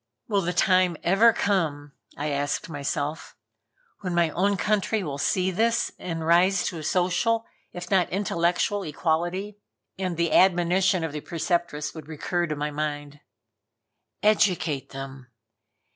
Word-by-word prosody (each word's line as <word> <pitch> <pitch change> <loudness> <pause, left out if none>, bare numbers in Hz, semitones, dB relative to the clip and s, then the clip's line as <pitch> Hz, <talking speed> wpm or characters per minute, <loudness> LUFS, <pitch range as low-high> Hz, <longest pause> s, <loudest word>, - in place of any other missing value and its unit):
"Will 205 -3 +1
the 175 -1 -1
time 185 -1 +3
ever 195 +6 +5
come," 160 -10 -1 0.3
I 150 +1 -2
asked 145 0 -2
myself, 145 +1 -4 0.6
"when 180 -3 -3
my 170 -2 +2
own 200 +4 +1
country 210 +2 0
will 140 -4 -4
see 185 +5 +1
this 230 +5 +1
and 165 -2 -4
rise 175 +3 +4
to 170 - -3
a - - -7
social, 185 +8 +1 0.3
if 175 +1 -8
not 190 -3 +3
intellectual 180 +1 0
equality." 175 +5 -2 0.4
And 180 -3 -2
the 170 -2 +1
admonition 185 0 +3
of 160 - -2
the 150 0 -5
Preceptress 170 -3 -2
would 155 -3 -10
recur 175 +3 -2
to 155 - -3
my 150 +1 -3
mind: 145 -1 -4 1.0
"Educate 180 -10 +2
them. 135 -1 -8
175 Hz, 140 wpm, -25 LUFS, 150-190 Hz, 1.0 s, ever